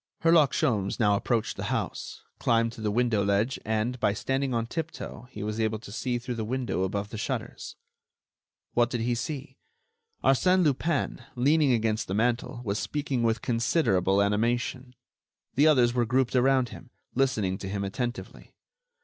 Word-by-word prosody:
Herlock 165 -4 +5
Sholmes 100 -3 0
now 105 -3 +4
approached 115 +2 -1
the - - -4
house, - - -3 0.2
climbed 115 0 +2
to 115 - -10
the 105 - 0
window 115 -1 +2
ledge 100 +6 +1
and, 110 +3 -1
by 105 -3 +2
standing 135 +5 -1
on 115 -2 0
tiptoe, 145 -4 -6
he 105 -4 -7
was 105 +1 -3
able 110 -1 0
to 105 -1 -11
see 120 +3 -2
through 125 +1 -5
the 115 -2 -3
window 120 -4 -2
above 100 +2 -2
the 110 - -6
shutters. - - -4 1.0
What 120 0 +3
did 120 -2 -2
he 120 +1 +1
see? 135 +4 -5 0.6
Arsène 180 +7 +4
Lupin, 150 +1 0
leaning 145 +3 +3
against 110 -2 0
the 95 - -2
mantel, 120 +2 0
was 100 0 -1
speaking 140 -4 -2
with 115 -1 +1
considerable 115 - +2
animation. 120 +4 -1 0.6
The 145 +4 +4
others 125 -6 +4
were 120 -2 +1
grouped 130 +1 +1
around 130 -1 +3
him, 130 - -11 0.2
listening 110 -8 0
to 95 - -5
him 100 0 -2
attentively. 120 +5 -5
120 Hz, 165 wpm, -27 LUFS, 105-130 Hz, 1.0 s, Herlock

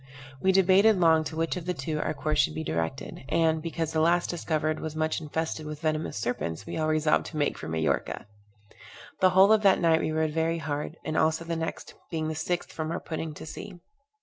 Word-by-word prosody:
We 190 - +4
debated 195 +2 +5
long 160 -2 +5
to 155 - -5
which 165 +2 -1
of 175 -1 -7
the 180 - -1
two 150 +2 -3
our - - -2
course 150 +1 -1
should 75 - +2
be 80 - -3
directed; 80 - -3
and, 160 -1 +2
because 165 -1 -3
the 160 - +2
last 170 +2 +2
discovered 155 -2 -1
was 155 -1 -5
much 155 +1 -1
infested 155 0 -3
with 150 0 -7
venomous 155 -6 -1
serpents, 105 -7 -3
we - - -6
all 155 -1 0
resolved 155 0 +2
to 155 - -7
make 145 -1 +1
for - - -8
Majorca. 80 -3 -1 0.9
The 185 - +5
whole 190 +3 +6
of 215 - +4
that 195 -2 +5
night 165 -2 +3
we 155 - -1
rowed 155 0 0
very 165 +1 0
hard, 150 +1 -4
and 155 - -2
also 160 +1 +2
the 165 0 -2
next, 165 0 -5 0.2
being 160 -2 -2
the - - -2
sixth 175 +3 -2
from 155 -1 -3
our 170 - -2
putting 160 -1 -5
to - - -9
sea. 175 +3 -8
160 Hz, 220 wpm, -27 LUFS, 155-170 Hz, 0.9 s, whole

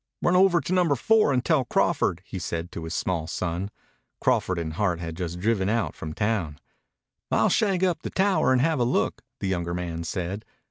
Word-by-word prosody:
"Run 175 - +3
over 185 -2 +5
to 185 - -3
Number 175 -6 +3
Four 215 - +3
and 125 -2 0
tell 155 -5 +3
Crawford," 95 -6 +1
he 95 - -6
said 85 +1 -4
to 80 - -6
his 80 - -5
small 85 -4 -1
son. 90 +3 -3 0.5
Crawford 95 - +1
and 80 -2 -3
Hart 90 -2 0
had 80 -1 -5
just 90 0 -4
driven 100 -1 +1
out 115 +1 0
from 80 0 -7
town. 95 -7 -1 0.7
"I'll - - +3
shag 195 -4 +2
up 180 -3 +1
the - - -4
tower 195 -7 +2
and 130 -1 +4
have 160 0 +1
a - - +3
look," 120 - 0 0.2
the - - -1
younger 85 -2 -1
man 85 -2 -4
said. 90 +5 -4
95 Hz, 200 wpm, -25 LUFS, 85-145 Hz, 0.7 s, over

